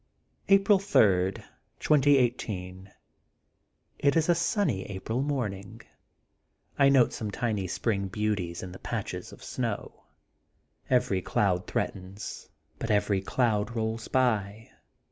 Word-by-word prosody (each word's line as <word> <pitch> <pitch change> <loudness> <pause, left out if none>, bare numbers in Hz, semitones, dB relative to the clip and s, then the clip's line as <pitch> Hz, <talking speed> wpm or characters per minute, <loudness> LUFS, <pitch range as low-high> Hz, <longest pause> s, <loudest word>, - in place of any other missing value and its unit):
April 195 0 +5
3, 95 - +3 0.5
2018: 120 -10 +1 0.5
— - - -32
^It 140 +2 +4
is 160 +1 +1
a - - +7
sunny 165 - 0
April 105 +5 -3
morning. 110 -7 -3 1.0
I 140 -1 +6
note 135 -4 +4
some 110 - -4
tiny 105 -2 -2
spring 100 +1 -1
beauties 95 -4 -2
in 95 - -7
the 95 - -10
patches - - -5
of - - -13
snow. - - -4 0.8
Every 125 -7 +2
cloud 90 -1 0
threatens, 95 +2 -5 0.3
but 115 - -4
every 105 -2 +2
cloud 110 +1 0
rolls 110 0 -2
by. 110 -4 0
110 Hz, 115 wpm, -28 LUFS, 95-130 Hz, 1.0 s, a